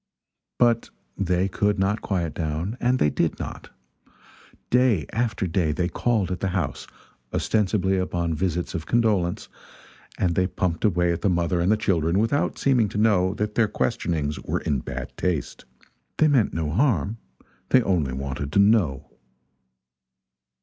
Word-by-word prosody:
But 120 Hz, -2 st, +2 dB, 0.3 s
they 90 Hz, -1 st, 0 dB
could 105 Hz, +1 st, 0 dB
not 95 Hz, +3 st, 0 dB
quiet 85 Hz, -6 st, -2 dB
down 80 Hz, +7 st, -3 dB
and 125 Hz, +1 st, +2 dB
they 75 Hz, -, +2 dB
did -, -, 0 dB
not. -, -, -7 dB, 1.0 s
Day 125 Hz, -, +3 dB
after 115 Hz, -4 st, -1 dB
day 85 Hz, -2 st, 0 dB
they 90 Hz, +3 st, -1 dB
called 110 Hz, -6 st, 0 dB
at 90 Hz, -, -3 dB
the 95 Hz, -, -1 dB
house, 90 Hz, -, -3 dB, 0.4 s
ostensibly 95 Hz, -3 st, +1 dB
upon 85 Hz, -2 st, -1 dB
visits 90 Hz, +1 st, -2 dB
of 85 Hz, -2 st, -5 dB
condolence, 105 Hz, -7 st, +1 dB, 0.7 s
and 90 Hz, -2 st, +1 dB
they 90 Hz, +2 st, +1 dB
pumped 90 Hz, -2 st, -2 dB
away 90 Hz, -4 st, +2 dB
at 85 Hz, -, -5 dB
the 100 Hz, -, +2 dB
mother 85 Hz, 0 st, +1 dB
and 90 Hz, +4 st, +2 dB
the 110 Hz, -, +3 dB
children 85 Hz, -4 st, +1 dB
without 115 Hz, +7 st, +1 dB
seeming 125 Hz, -6 st, +2 dB
to 100 Hz, -, -5 dB
know 100 Hz, -3 st, +3 dB
that 105 Hz, 0 st, -2 dB
their 115 Hz, -1 st, +3 dB
questionings 85 Hz, -9 st, -1 dB
were -, -, -3 dB
in 70 Hz, -3 st, 0 dB
bad -, -, -7 dB
taste. 90 Hz, -5 st, -2 dB, 0.5 s
They 155 Hz, -, +4 dB
meant 135 Hz, -8 st, +3 dB
no 80 Hz, -2 st, -2 dB
harm 110 Hz, -, +1 dB, 0.5 s
they 130 Hz, -2 st, +5 dB
only 80 Hz, -11 st, 0 dB
wanted 70 Hz, +1 st, -4 dB
to -, -, +3 dB
know. 95 Hz, -10 st, +3 dB
95 Hz, 155 wpm, -24 LUFS, 85-110 Hz, 1.0 s, they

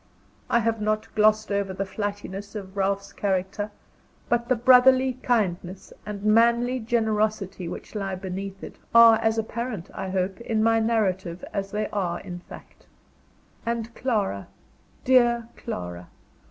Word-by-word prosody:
I -, -, +4 dB
have 225 Hz, -1 st, 0 dB
not 215 Hz, 0 st, -1 dB
glossed 215 Hz, 0 st, +3 dB
over 200 Hz, -1 st, -1 dB
the 190 Hz, -, -2 dB
flightiness 205 Hz, 0 st, -5 dB
of 195 Hz, -2 st, -7 dB
Ralph's 200 Hz, 0 st, -1 dB
character; 195 Hz, +1 st, -1 dB, 0.6 s
but 240 Hz, 0 st, 0 dB
the 255 Hz, -, +4 dB
brotherly 255 Hz, +2 st, +6 dB
kindness 185 Hz, -5 st, -1 dB
and 205 Hz, -1 st, -5 dB
manly 235 Hz, +3 st, +3 dB
generosity 215 Hz, -5 st, -1 dB
which -, -, -8 dB
lie 195 Hz, -3 st, -3 dB
beneath 195 Hz, +1 st, -6 dB
it, -, -, -9 dB, 0.2 s
are 230 Hz, -1 st, +9 dB
as 225 Hz, 0 st, +1 dB
apparent, 225 Hz, -3 st, -4 dB
I 190 Hz, -1 st, -4 dB
hope, 185 Hz, +2 st, -2 dB
in 220 Hz, -2 st, 0 dB
my 225 Hz, 0 st, +4 dB
narrative 190 Hz, -6 st, 0 dB
as 195 Hz, -1 st, -2 dB
they 210 Hz, +1 st, -2 dB
are 185 Hz, -4 st, -2 dB
in 175 Hz, 0 st, -8 dB
fact. -, -, -14 dB, 0.8 s
And 230 Hz, 0 st, -3 dB
Clara, 210 Hz, -, -1 dB, 0.6 s
dear 240 Hz, -2 st, +3 dB
Clara! 90 Hz, 0 st, -6 dB
210 Hz, 140 wpm, -25 LUFS, 190-230 Hz, 0.8 s, are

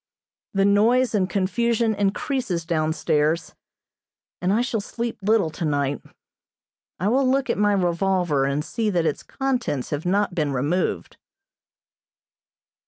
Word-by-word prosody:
The 195 Hz, 0 st, +3 dB
noise 230 Hz, +5 st, +3 dB
and 190 Hz, -3 st, +1 dB
confusion 220 Hz, +5 st, +1 dB
increases 200 Hz, -, -1 dB
down 155 Hz, -1 st, 0 dB
stairs, 160 Hz, +1 st, 0 dB, 0.9 s
and 180 Hz, +1 st, +1 dB
I 220 Hz, +4 st, +3 dB
shall 240 Hz, -4 st, -1 dB
sleep 235 Hz, +2 st, -5 dB
little 200 Hz, -5 st, +2 dB
tonight. 145 Hz, -3 st, -1 dB, 1.0 s
I 185 Hz, -, 0 dB
will 255 Hz, +4 st, +3 dB
look 270 Hz, -1 st, +1 dB
at -, -, -2 dB
my 205 Hz, 0 st, +3 dB
revolver 180 Hz, -5 st, +1 dB
and 140 Hz, +2 st, -1 dB
see 220 Hz, +5 st, -1 dB
that 175 Hz, -4 st, +1 dB
its 155 Hz, -, -1 dB
contents 250 Hz, -, -2 dB
have 150 Hz, +3 st, -3 dB
not 200 Hz, +1 st, +1 dB
been 150 Hz, -5 st, -1 dB
removed. 145 Hz, +8 st, -1 dB
195 Hz, 130 wpm, -23 LUFS, 160-225 Hz, 1.0 s, The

